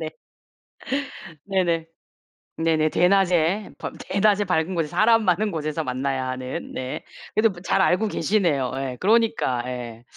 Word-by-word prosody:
네. - - -4 1.3
네네. 175 -4 0 0.7
네네. 160 -1 +2
대낮에 185 +1 +2
밤 - - -6
대낮에 205 0 +2
밝은 180 0 0
곳에 165 -3 0
사람 225 +4 +4
많은 195 +3 +2
곳에서 155 0 -2
만나야 130 +1 -2
하는 130 0 -5
네. 130 0 -5 0.3
그래도 225 +1 +4
뭐 175 - -11
잘 190 - +1
알고 190 +4 +3
계시네요. 165 -15 +1
예. 135 -2 -4
그러니까 210 - +2
예. 120 -2 -6
165 Hz, 270 characters per minute, -24 LUFS, 135-195 Hz, 1.3 s, 사람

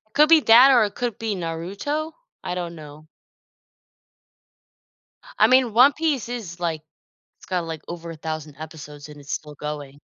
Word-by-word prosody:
Could 300 +1 +5
be 330 0 +8
that, 245 +4 +7
or 245 -4 +5
it 205 - -4
could 240 -4 -3
be 225 -2 -2
Naruto. 195 - -4 0.3
I 180 - -3
don't 175 -2 -5
know. 150 0 -12 2.3
I - - +6
mean, 255 -3 +4
One 255 +6 +6
Piece 295 -6 -1
is, 205 -8 -7
like 165 -3 -2 0.6
it's - - -17
got, 180 -2 -2
like, 160 -2 -6
over 170 -1 -7
1,000 155 -2 -6
episodes, 150 -2 -10
and 145 -1 -12
it's 145 +1 -9
still 150 -1 -5
going. 145 -1 -7
175 Hz, 160 wpm, -23 LUFS, 155-240 Hz, 2.3 s, be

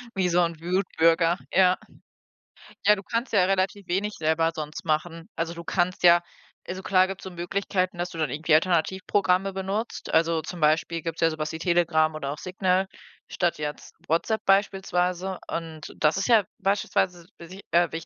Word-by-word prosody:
Wie 185 -2 +1
so 175 +1 +2
'n 165 -2 -6
Wutbürger. 170 -1 +2
Ja. 185 0 +4 1.1
Ja, 210 - +7
du 195 - -9
kannst 230 +3 -3
ja 190 -3 +5
relativ 195 +1 -1
wenig 200 +4 -1
selber 160 +1 +1
sonst 155 -1 -6
machen. 165 +1 -2
Also, 165 +1 -2
du 170 0 -8
kannst 180 +1 -1
ja 175 0 +7 0.5
also, 185 +1 -5
klar 185 -1 +3
gibt's 195 0 -7
so 190 - -6
Möglichkeiten, 185 0 -2
dass 175 +1 -2
du 170 - -10
dann 155 -5 -1
irgendwie 155 +1 +2
Alternativprogramme 185 +3 +1
benutzt. 195 +4 -4
Also, 165 0 +2
zum 175 +1 -8
Beispiel 160 +2 +1
gibt's 165 0 -5
ja 165 - +5
sowas 155 -1 -4
wie 160 - -6
Telegram 165 -3 +2
oder 140 -2 -4
auch 150 - -7
Signal 185 +1 0 0.4
statt 175 -4 -1
jetzt 150 0 -6
WhatsApp 170 +7 0
beispielsweise, 190 -2 +1
und 160 -2 -6
das 155 +2 +3
ist 195 - -1
ja 225 -4 +5 0.2
beispielsweise 190 -3 0
e 170 - -11
si 190 +3 -11
äh, 175 0 +3
wich 165 0 -5
175 Hz, 175 wpm, -25 LUFS, 165-190 Hz, 1.1 s, Ja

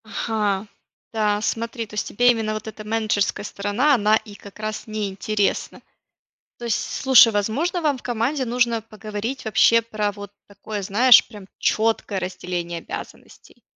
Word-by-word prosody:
Ага, 215 -2 -2 0.5
да, 210 -2 +1
смотри, 230 +1 -3
то 210 - -18
есть 210 - -2
тебе 245 +3 +4
именно 220 -2 -2
вот 215 +1 -6
эта 215 0 -8
менеджерская 215 -2 0
сторона, 205 +9 +1
она 215 -2 +3
и 210 -2 -12
как 200 0 -14
раз 215 +1 -5
неинтересна. 205 -1 -2 0.8
То 240 - -8
есть, 230 -3 +1
с - - -5
слушай, 255 -4 +7
возможно, 260 - 0
вам 295 -5 0
в - - -15
команде 245 +4 -1
нужно 235 -2 0
поговорить 215 +3 -6
вообще 220 +2 +4
про 215 -2 -2
вот 205 0 -10
такое, 205 +1 -7
знаешь, 230 +6 +6
прям 210 -4 -12
четкое 220 -2 0
разделение 180 -2 -4
обязанностей. - - -10
215 Hz, 155 wpm, -22 LUFS, 205-230 Hz, 0.8 s, слушай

